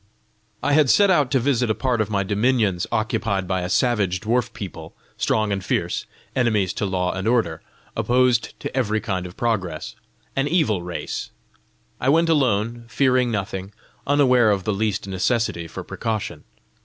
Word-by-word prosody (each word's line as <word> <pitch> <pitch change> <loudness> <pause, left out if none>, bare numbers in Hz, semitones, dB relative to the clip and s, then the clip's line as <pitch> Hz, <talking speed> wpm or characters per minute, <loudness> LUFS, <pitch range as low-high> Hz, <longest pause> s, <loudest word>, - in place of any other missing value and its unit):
"I 145 - +2
had 150 -2 +4
set 200 - +5
out 145 -7 +3
to 135 - +2
visit 125 -2 +1
a 110 - +2
part 125 -4 0
of 110 - -1
my 100 -2 0
dominions 105 -2 +1
occupied 110 -4 -1
by 95 0 0
a 90 - -3
savage 100 -5 +1
dwarf 120 +3 0
people, 90 -8 -8 0.2
strong 110 -1 0
and 95 -1 -2
fierce, - - -1 0.3
enemies 110 -7 +1
to 105 - -2
law 90 -1 0
and 95 +2 -3
order, 115 -10 +1 0.3
opposed 125 -2 +2
to - - -5
every 110 -5 +1
kind 95 -4 -3
of 90 - -13
progress 95 -9 -2 0.4
an 135 +1 +1
evil 145 - +2
race. 85 0 -5 0.7
I 130 - +1
went 165 +3 +4
alone, 120 -5 +1
fearing 125 0 +2
nothing, 95 -2 -4 0.3
unaware 130 -5 +4
of 100 -2 +1
the 105 - 0
least 100 -1 -1
necessity 95 -2 0
for - - -7
precaution. 105 -8 -4
110 Hz, 165 wpm, -22 LUFS, 95-125 Hz, 0.7 s, set